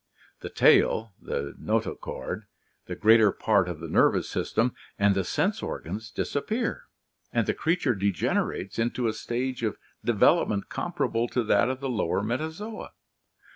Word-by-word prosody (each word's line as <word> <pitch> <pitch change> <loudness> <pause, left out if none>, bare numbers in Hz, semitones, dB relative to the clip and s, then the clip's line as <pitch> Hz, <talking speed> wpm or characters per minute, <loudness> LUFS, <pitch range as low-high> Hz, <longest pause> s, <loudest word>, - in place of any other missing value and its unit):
The - - -6
tail, 110 -2 +4
the 70 0 -4
notochord, - - -3 0.4
the - - -4
greater 110 -1 +6
part 100 -4 +2
of 85 -3 -5
the 85 - -6
nervous - - +3
system, 115 +2 0 0.2
and 100 0 +4
the 95 0 0
sense - - 0
organs 105 +6 -5
disappear, 225 - -2 0.5
and - - +1
the - - +1
creature 165 -6 +1
degener 100 -4 0
ates 95 +4 -6
into 120 +1 0
a 110 - 0
stage 125 +3 -3
of 110 -3 -1 0.3
development 100 -1 +3
comparable 115 +1 -1
to 120 0 0
that 105 +2 +3
of 130 +1 -3
the 135 - -2
lower 105 -5 0
Metazoa. 160 - -4
115 Hz, 145 wpm, -27 LUFS, 100-130 Hz, 0.5 s, greater